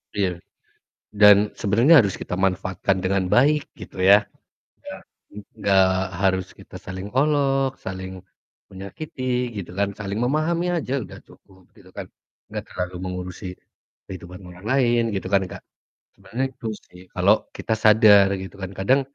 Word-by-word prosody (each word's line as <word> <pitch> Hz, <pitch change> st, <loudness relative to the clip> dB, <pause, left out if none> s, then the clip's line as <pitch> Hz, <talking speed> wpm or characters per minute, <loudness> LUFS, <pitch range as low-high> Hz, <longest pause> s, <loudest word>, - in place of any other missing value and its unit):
Iya, 95 Hz, -4 st, -1 dB, 0.7 s
dan 105 Hz, 0 st, +6 dB
sebenarnya 120 Hz, +9 st, +5 dB
harus 100 Hz, -4 st, -2 dB
kita -, -, -7 dB
manfaatkan 95 Hz, +1 st, 0 dB
dengan 95 Hz, -1 st, 0 dB
baik 145 Hz, +6 st, +3 dB
gitu 95 Hz, -, -8 dB
ya. 100 Hz, +3 st, +6 dB, 0.6 s
Iya, -, -, -8 dB, 0.3 s
mhm, 105 Hz, -, -10 dB, 0.2 s
nggak 95 Hz, -1 st, +4 dB, 0.3 s
harus 95 Hz, -2 st, +1 dB
kita -, -, -14 dB
saling 95 Hz, +1 st, -7 dB
olok, 135 Hz, -1 st, +1 dB
saling 95 Hz, 0 st, -7 dB, 0.6 s
menyakiti 125 Hz, -, -4 dB
gitu 90 Hz, -, -11 dB
kan, 100 Hz, 0 st, 0 dB
saling 100 Hz, 0 st, -5 dB
memahami 155 Hz, +8 st, 0 dB
aja 155 Hz, -6 st, -2 dB
udah -, -, -12 dB
cukup 95 Hz, -2 st, -22 dB
gitu -, -, -18 dB
kan, -, -, -8 dB, 0.4 s
nggak -, -, -6 dB
terlalu 90 Hz, 0 st, -5 dB
mengurusi 90 Hz, 0 st, -6 dB, 0.6 s
kehidupan 90 Hz, 0 st, -9 dB
orang 90 Hz, +3 st, -14 dB
lain 120 Hz, -1 st, +2 dB
gitu 95 Hz, -1 st, -3 dB
kan 100 Hz, -1 st, +2 dB
Kak? -, -, -10 dB, 0.5 s
Sebenarnya 130 Hz, +3 st, -4 dB
itu 120 Hz, -, -8 dB, 0.2 s
sih, 90 Hz, -, -16 dB
kalau 95 Hz, +3 st, +4 dB, 0.2 s
kita 110 Hz, -, -3 dB
sadar 105 Hz, -2 st, +6 dB
gitu 95 Hz, 0 st, -9 dB
kan 95 Hz, 0 st, -5 dB
kadang 130 Hz, +9 st, +2 dB
100 Hz, 145 wpm, -23 LUFS, 95-125 Hz, 0.7 s, dan